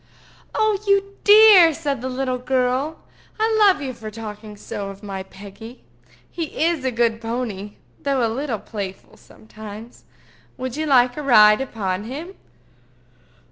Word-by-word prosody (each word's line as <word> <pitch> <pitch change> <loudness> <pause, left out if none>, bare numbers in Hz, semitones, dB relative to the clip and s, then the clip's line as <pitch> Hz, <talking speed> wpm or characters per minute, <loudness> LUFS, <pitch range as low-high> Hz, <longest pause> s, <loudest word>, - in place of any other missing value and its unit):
"Oh, 435 -2 +1
you 395 0 +1
dear!" 410 -6 +8
said 285 -6 -3
the 260 - -4
little 255 -1 -2
girl. 260 +4 -1 0.4
"I 440 0 +1
love 390 -8 +4
you 260 -2 -4
for 220 -2 -8
talking 210 -1 -9
so 200 0 -6
of 195 +1 -11
my 195 -2 -5
Peggy. 200 +5 -12 0.4
He 325 -2 -4
is 335 -5 0
a 260 - +1
good 230 -2 0
pony, 225 -4 -4 0.3
though 275 -4 0
a - - +1
little 240 +1 -3
playful 195 -2 -8
sometimes. 215 +1 -12 0.5
Would 255 -1 -5
you 310 +1 -3
like 250 -2 +3
a - - -3
ride 215 -5 +6
upon 205 -6 -3
him?" 305 +10 -7
250 Hz, 145 wpm, -21 LUFS, 215-300 Hz, 0.5 s, dear